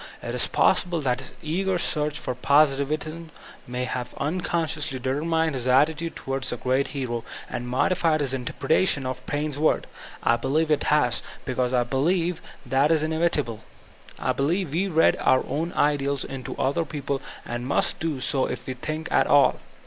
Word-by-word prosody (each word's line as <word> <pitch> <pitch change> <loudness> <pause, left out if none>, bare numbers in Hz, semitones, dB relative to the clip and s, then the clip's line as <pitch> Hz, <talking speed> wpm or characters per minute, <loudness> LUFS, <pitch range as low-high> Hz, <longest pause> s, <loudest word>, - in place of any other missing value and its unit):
It - - -3
is - - +2
possible 175 -2 +2
that 125 -3 0
his 130 - -10
eager 185 +4 0
search 150 -3 0
for 130 - -3
positivism 150 +4 +1 0.4
may 125 +1 -3
have 125 -1 -4
uncon 170 +3 -1
sdoosly 150 -2 -1
determined 160 +5 0
his 130 -2 -3
attitude 150 +6 +2
towards 135 -1 -2
the 120 - -2
great 130 +3 +1
hero, 125 -4 -3 0.2
and 120 - -5
modified 155 +5 +2
his 140 -3 0
interpretation 135 +3 +1
of 130 0 -4
Paine's 145 -1 -2
words. 155 - +2 0.4
I 120 - +4
be 120 - -4
lieve 155 +3 +1
it 150 - +2
has; 145 -5 +3 0.2
because 125 -2 0
I 125 -1 +3
believe 165 +7 0 0.3
thai 135 +3 +3
is 155 -1 +2
inevitable, 155 -8 0 0.5
I - - 0
believe 160 +3 0
we 185 +5 +1
read 165 -3 +3
our 130 - +3
own 165 +4 -2
ideals 140 -1 +1
into 135 -2 -6
other 145 +6 +1
people, 140 -2 -3 0.2
and 120 +1 -4
must 140 - +1
do 160 -4 -2
so 130 +1 0
if 125 0 -5
we 130 - -3
think 155 +5 -4
at - - +3
all. 145 -1 +5
145 Hz, 170 wpm, -25 LUFS, 130-160 Hz, 0.5 s, all